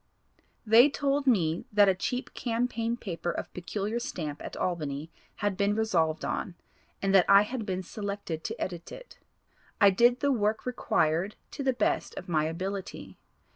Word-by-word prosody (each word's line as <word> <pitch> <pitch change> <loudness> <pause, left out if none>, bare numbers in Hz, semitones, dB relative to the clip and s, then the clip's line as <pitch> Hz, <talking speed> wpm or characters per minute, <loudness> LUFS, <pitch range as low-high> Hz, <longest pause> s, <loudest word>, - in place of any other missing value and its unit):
They 230 +6 +7
told 280 0 0
me 170 -9 +2
that 205 -1 +5
a 190 - +5
cheap 250 +7 -3
campaign 235 -1 -1
paper 175 -6 -4
of - - -4
peculiar 205 +5 -3
stamp 155 -10 -5
at - - -7
Albany 155 -3 -3 0.2
had 205 -1 -1
been 200 +2 +1
resolved 170 -8 +1
on, 180 - -3 0.5
and 195 0 +2
that 190 -2 +5
I 200 +1 +8
had 225 0 -5
been 185 -1 -2
selected 200 -5 -5
to 225 - -4
edit 175 -2 -5
it. - - -11 0.6
I 200 -2 +7
did 240 +5 +4
the 285 - +2
work 220 -3 0
required 195 -6 0 0.2
to - - -6
the 270 -1 +2
best 255 - -1
of - - -7
my 155 -3 +1
ability. 175 - -5
200 Hz, 165 wpm, -28 LUFS, 175-235 Hz, 0.6 s, I